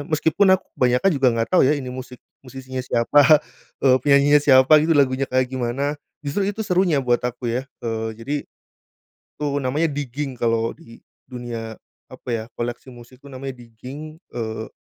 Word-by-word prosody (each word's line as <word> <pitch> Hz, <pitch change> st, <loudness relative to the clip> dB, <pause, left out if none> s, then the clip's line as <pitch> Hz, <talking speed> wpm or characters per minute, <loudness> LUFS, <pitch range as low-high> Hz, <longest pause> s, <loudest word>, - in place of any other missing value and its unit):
Meskipun 160 Hz, +6 st, +2 dB
aku -, -, -19 dB
kebanyakan 125 Hz, +9 st, +3 dB
juga 135 Hz, -3 st, +3 dB
nggak 115 Hz, 0 st, -1 dB
tau 185 Hz, -, +5 dB
ya, 145 Hz, +3 st, +3 dB
ini 130 Hz, -3 st, -6 dB
musik, 125 Hz, -1 st, -9 dB, 0.2 s
musisi 130 Hz, 0 st, -11 dB
siapa, 145 Hz, +5 st, +4 dB, 0.4 s
eee, 130 Hz, -1 st, +5 dB
penyanyinya 145 Hz, +1 st, +5 dB
siapa 130 Hz, 0 st, +5 dB
gitu, 165 Hz, +1 st, +2 dB
lagunya 135 Hz, -1 st, +2 dB
kayak 130 Hz, 0 st, +1 dB
gimana. 130 Hz, +3 st, -2 dB, 0.3 s
Justru 145 Hz, +8 st, -1 dB
itu 205 Hz, +2 st, -4 dB
serunya 180 Hz, -5 st, +2 dB
buat 120 Hz, -2 st, +1 dB
aku 125 Hz, 0 st, -3 dB
ya, 130 Hz, -, -1 dB, 0.2 s
eee, 110 Hz, -1 st, -2 dB
jadi 140 Hz, +6 st, -3 dB, 1.0 s
itu 150 Hz, -, -3 dB, 0.2 s
namanya 145 Hz, +5 st, 0 dB
digging 140 Hz, 0 st, -4 dB
kalau 115 Hz, -1 st, +1 dB
di 115 Hz, 0 st, -16 dB, 0.3 s
dunia 115 Hz, -3 st, -6 dB, 0.3 s
apa -, -, -11 dB
ya, 110 Hz, -1 st, -2 dB
koleksi 120 Hz, +2 st, -5 dB
musik 120 Hz, +2 st, -15 dB
itu 140 Hz, -, -14 dB
namanya 135 Hz, 0 st, -6 dB
digging, 130 Hz, +7 st, -10 dB, 0.2 s
eee 110 Hz, -2 st, -5 dB
130 Hz, 160 wpm, -22 LUFS, 120-145 Hz, 1.0 s, tau